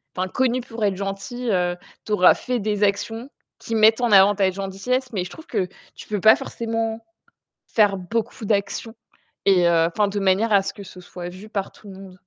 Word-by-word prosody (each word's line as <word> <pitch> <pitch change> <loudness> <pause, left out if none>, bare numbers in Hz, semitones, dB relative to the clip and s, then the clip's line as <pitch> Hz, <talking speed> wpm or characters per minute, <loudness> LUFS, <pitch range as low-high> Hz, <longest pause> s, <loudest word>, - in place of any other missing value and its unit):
enfin 185 +1 -1
connue 255 +4 0
pour 230 -2 -7
être 195 -2 +1
gentille, 200 +5 -4
heu, 175 -1 +1 0.3
tu 215 - -7
auras 185 -3 +6
fait 250 -1 -3
des 210 0 -1
actions 225 +5 -1 0.3
qui 230 - -6
mettent 220 +2 +5
en 240 -3 +1
avant 200 +1 +7
ta 190 -2 +2
gentillesse 200 +7 -3
mais 185 -3 -1
je 180 - -8
trouve 320 - -12
que 195 -5 -1 0.3
tu - - -12
peux 210 -2 -2
pas 220 - +8
forcément 225 -1 -4 0.6
faire 205 -3 +3
beaucoup 220 +5 -4
d'actions 205 +2 -2 0.5
et 185 -3 +4
heu, 165 -1 +4
enfin, 205 +4 0
de 205 0 -3
manière 195 +4 +2
à 200 -1 +5
ce 195 - -5
que 200 - -10
ce 185 0 -12
soit 175 0 -8
vu 190 +4 -11
par 195 -2 -3
tout 205 - -15
le 190 - -10
monde. 190 -1 -12
205 Hz, 210 wpm, -22 LUFS, 190-225 Hz, 0.6 s, pas